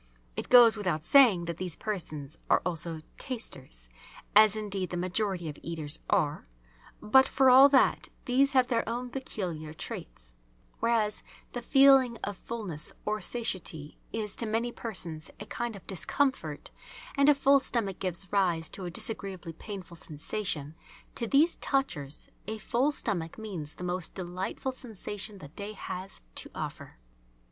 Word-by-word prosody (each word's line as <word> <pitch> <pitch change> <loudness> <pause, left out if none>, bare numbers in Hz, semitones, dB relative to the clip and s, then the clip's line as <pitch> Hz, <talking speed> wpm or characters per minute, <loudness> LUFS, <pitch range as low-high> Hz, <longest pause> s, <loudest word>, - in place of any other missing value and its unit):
It - - -4
goes 240 -3 +9
without 175 -7 -1
saying 220 - +6
that 170 -1 -4
these 180 -3 0
persons 155 -9 -4
are - - +4
also 165 -2 -1 0.2
"tasters," 135 - -6 0.5
as 215 0 +8
indeed 200 -4 -2
the 175 - -3
majority 185 -1 -1
of 150 - -6
eaters 160 -3 -3
are. 155 - +1 0.6
But 265 +5 +6
for 265 -1 +5
all 265 +2 +9
that, 270 -2 +4 0.2
these 275 +3 +3
have 255 -2 +4
their 235 -3 +2
own 245 +1 -3
peculiar 175 - -5
traits; - - -6 0.5
whereas 225 -2 +1 0.3
the 245 - -3
feeling 270 -2 +6
of 205 - -2
fullness 190 -8 -5
or 215 0 -1
satiety 180 -9 -2
is 215 -3 -3
to 230 - -2
many 230 +3 0
persons 175 -10 -3
a 210 - -6
kind 235 0 -4
of 195 - -12
discomfort, 270 - -1 0.4
and 280 0 +5
a 295 - +7
full 275 0 +5
stomach 230 -8 -2
gives 185 0 -3
rise 175 -5 +1
to 190 - -7
a - - -3
disagreeably 190 -2 -4
painful 185 -1 -8
sensation, 155 -1 -3 0.4
to 235 - -2
these 300 +8 +4
"touchers" 160 - -1 0.2
a 220 +1 -3
full 245 +6 +1
stomach 175 - -2
means 185 -9 -5
the - - -8
most 180 0 -3
delightful 185 +7 -3
sensation 210 -4 -6
the 145 -7 -11
day 205 +7 -7
has 190 -1 -7
to - - -5
offer. - - -6
200 Hz, 150 wpm, -29 LUFS, 170-235 Hz, 0.6 s, goes